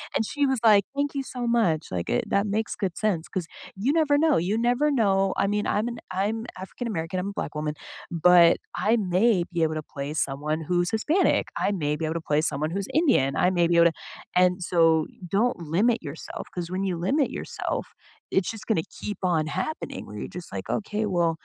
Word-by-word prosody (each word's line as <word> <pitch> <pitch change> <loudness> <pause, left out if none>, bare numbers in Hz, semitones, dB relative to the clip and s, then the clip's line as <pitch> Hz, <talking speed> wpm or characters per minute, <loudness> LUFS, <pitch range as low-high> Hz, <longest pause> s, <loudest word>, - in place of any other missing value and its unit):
And 225 - +1
she 290 +5 0
was, 265 -3 +1
like, 205 -2 +7
"Thank 285 0 -1
you 275 - 0
so 250 -1 -7
much, 190 -10 +2
like, 85 -2 -3
eh - - +1
it - - -5
that 200 +1 +2
makes 215 +2 -1
good 190 -4 -3
sense," 190 -7 0
'cause 185 -4 -3 0.3
you 240 +10 0
never 300 -3 +3
know, 315 0 +3
you 190 +6 0
never 245 +6 +2
know. 195 -7 +2
I - - +2
mean, 210 +1 0
I'm 215 +3 0
an 235 -1 -5
I'm 210 +5 -1
African 195 +6 -6
American, 180 -2 -3
I'm 195 +2 -3
a - - -6
black 150 - -4
woman, 150 0 -2 0.4
but 170 0 +6 0.2
I 225 +3 +2
may 190 0 +2
be 170 - 0
able 155 0 0
to 155 - -3
play 140 +1 -6
someone 150 +3 -1
who's 175 0 +1
Hispanic, 305 - +2 0.2
I 205 - +2
may 150 -6 -1
be 160 - -2
able 160 +1 -2
to 165 - -2
play 150 - +4
someone 155 +1 -1
who's 195 0 -2
Indian, 135 - +2
I 180 - +3
may 175 -2 +2
be 170 - +2
able 170 0 +7
to 165 - 0 0.4
and 180 0 +3
so 165 -2 +3 0.3
don't 245 +4 +2 0.2
limit 230 +5 +3
yourself 150 +1 -7
'cause 175 -1 -4
when 190 +1 -1
you 180 -3 -1
limit 255 - +1
yourself, - - -4 0.4
it's 190 - +1
just 225 -2 -10
gonna 205 -8 +1 0.2
keep 205 - -4
on 165 -4 +2
happening 310 - -4
where 105 - -9
you're - - -5
just, 175 - -12
like, 95 -1 -5
"Okay, 210 +1 -3
well, 170 -1 +3
190 Hz, 220 wpm, -26 LUFS, 165-225 Hz, 0.4 s, like